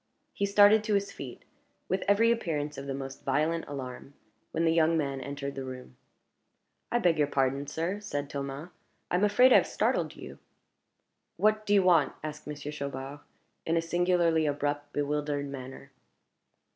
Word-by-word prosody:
He 200 - -1
started 205 +2 +6
to 215 -2 +1
his 200 0 0
feet, 130 -3 -9 0.4
with 190 +1 0
every 220 +3 +4
appearance 150 -10 -2
of 140 0 -7
the 135 - -2
most 135 0 -7
violent 155 +5 0
alarm, 135 0 -7 0.3
when 165 +1 -1
the 165 - +3
young 165 0 +3
man 140 -3 -2
entered 140 +1 -5
the 135 - -5
room. 130 - -9 1.0
"I 240 - +3
beg 175 -8 +2
your 145 - +3
pardon, 135 0 0
sir," 170 +8 -2
said 145 -9 -4
Thomas; 140 +3 -5 0.4
"I - - +2
am 190 - +1
afraid 250 +5 +6
I - - +9
have - - +2
startled - - 0
you." - - -10 1.0
"What 215 0 +2
do 205 - +4
you 195 - +5
want?" 170 -6 +4
asked 155 0 -7
Monsieur 150 0 -6
Chaubard, 140 -1 -6 0.4
in 165 +1 0
a - - +2
singularly 170 -2 +2
abrupt, 145 0 -2
bewildered 145 0 -1
manner. 135 0 -9
150 Hz, 170 wpm, -29 LUFS, 140-180 Hz, 1.0 s, I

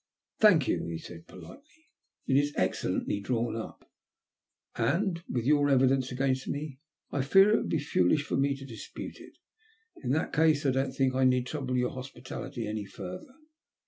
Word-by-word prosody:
" - - -57
Thank 180 - +6
you," - - 0
he 85 -1 -4
said, 85 0 -11
politely. 300 +4 -15
" - - -49
It - - +1
is 145 +1 +2
excellently 100 - 0
drawn 115 +1 -1
up, 115 - -8 0.9
and, 170 - 0
with 120 -2 -2
your 145 0 +4
evidence 130 -1 +3
against 130 0 0
me, 145 -2 -4 0.3
I 140 - 0
fear 195 +9 +6
it 215 - +5
would - - -3
be - - +1
foolish 145 - +2
for - - -3
me 140 0 +1
to 135 - -10
dispute 115 -5 -8
it. - - -14 0.7
In 125 - -3
that 155 - -1
case, 155 -1 +3
I 135 - +4
don't 135 0 -1
think 135 -1 +1
I 130 0 +1
need 125 -1 +3
trouble 130 -2 -3
your 125 0 +1
hospitality 130 -2 -7
any 105 -1 -4
further." 185 - -9
135 Hz, 180 wpm, -29 LUFS, 125-150 Hz, 0.9 s, Thank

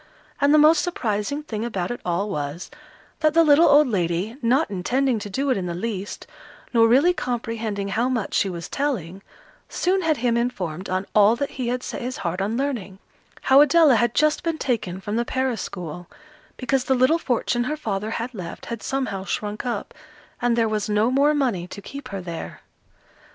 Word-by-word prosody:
And 285 0 +4
the 305 - +6
most 305 +1 +6
surprising 275 - -2
thing 220 -7 -4
about 195 -6 -3
it 240 - -5
all 180 +3 -1
was, 150 -2 -4 0.5
that 310 -1 +2
the 330 - +7
little 300 +1 +6
old 290 0 +6
lady, 185 0 -1
not 255 +5 +2
intending 245 +6 0
to 205 - -7
do 270 +7 -1
it 255 - +2
in 180 -2 -3
the 170 - -3
least, 200 0 -5 0.5
nor 230 -1 +5
really 280 +10 +5
comprehending 230 - -3
how 235 +5 0
much 235 -6 -2
she 195 - +2
was 170 -2 -6
telling, 195 - -3 0.5
soon 375 +2 +1
had 320 -4 +1
him 235 0 +1
informed 190 -8 -3
on 185 +1 -1
all 210 +2 +5
that 280 +3 -3
he 255 -3 -4
had 250 +1 -2
set - - -5
his 255 +1 -4
heart 175 +3 -1
on 215 +4 -1
learning 240 -9 -3 0.4
how 270 +2 +6
Adela 295 0 +6
had 240 +1 +1
just 305 0 +3
been 330 -1 -2
taken 215 - -2
from 205 +3 -3
the 235 - +2
Paris 260 -2 -1
school, 175 -1 -7 0.5
because 255 0 0
the 265 - +2
little 255 +7 +3
fortune 240 -3 0
her 300 +3 -2
father 210 -6 -3
had 230 +3 -4
left, 180 -6 -7
had 230 -2 -5
somehow 255 -8 -2
shrunk 210 +4 -4
up, 230 -4 -3 0.5
and 240 -1 +2
there 230 -1 +3
was 215 -1 -2
no 210 +3 +2
more 285 +3 +3
money 235 -12 0
to 195 - -9
keep 280 +8 -9
her 195 -1 -5
there. 170 -2 -7
235 Hz, 195 wpm, -23 LUFS, 195-270 Hz, 0.5 s, the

